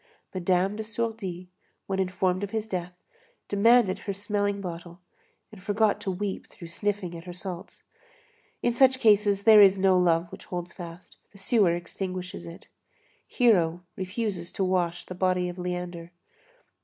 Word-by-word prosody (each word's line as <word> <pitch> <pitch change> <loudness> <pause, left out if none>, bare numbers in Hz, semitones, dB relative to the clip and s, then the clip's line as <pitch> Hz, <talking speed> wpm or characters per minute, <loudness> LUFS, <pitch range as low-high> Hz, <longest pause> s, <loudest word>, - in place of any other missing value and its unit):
Madame 185 +2 +1
de - - -3
Sourdis, 220 -5 -4 0.4
when 195 0 -2
informed 185 0 0
of 200 - -3
his 220 +1 -3
death, 180 -3 -4 0.5
demanded 205 -1 +4
her 200 - -4
smelling 205 0 -1
bottle, 175 -2 -7 0.5
and 210 -3 -13
forgot 210 +1 +1
to 205 - -3
weep, 190 +1 -4
through 170 - -11
sniffling 195 -1 -2
at 165 +1 -9
her 180 - -7
salts. 180 0 -8 0.8
In 240 - +2
such 260 +1 +5
cases, 205 -3 +4
there 215 -1 +8
is 195 -1 +7
no 190 -1 +4
love 170 -1 +2
which - - -10
holds 175 -1 -5
fast; 170 0 -10
the 200 - -16
sewer 195 -3 +3
extinguishes 180 - -5
it. 85 - -11 0.6
Hero 175 -8 +2
refuses 190 -2 -3
to 195 - -1
wash 175 -2 0
the - - -7
body 180 0 +1
of 175 +1 -8
Leander. 180 -1 -4
185 Hz, 155 wpm, -27 LUFS, 175-205 Hz, 0.8 s, there